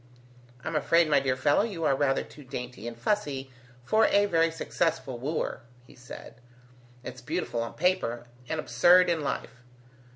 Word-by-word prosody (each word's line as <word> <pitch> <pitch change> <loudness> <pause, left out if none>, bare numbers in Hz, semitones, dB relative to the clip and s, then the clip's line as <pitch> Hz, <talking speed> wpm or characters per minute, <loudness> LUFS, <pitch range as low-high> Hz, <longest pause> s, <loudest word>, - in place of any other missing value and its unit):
"I'm 160 - -4
afraid, 165 +3 +3
my 145 - +6
dear 135 -1 0
fellow, 145 +6 +3
you 200 -7 -3
are 135 - +3
rather 135 -1 +1
too 150 - -14
dainty 125 -2 -7
and 115 -1 -7
fussy 135 - -2 0.3
for 220 - +4
a 205 0 +4
very 165 -4 +2
successful 165 -5 -2
wooer," 140 -1 -3 0.2
he - - -17
said. 125 -1 -12 0.6
"It's 125 -1 -8
beautiful 150 -4 -3
on 115 - -5
paper, 150 -10 0 0.2
and 160 - -2
absurd 180 +2 +5
in 165 -2 0
life. 125 -3 -4
145 Hz, 160 wpm, -28 LUFS, 125-170 Hz, 0.6 s, my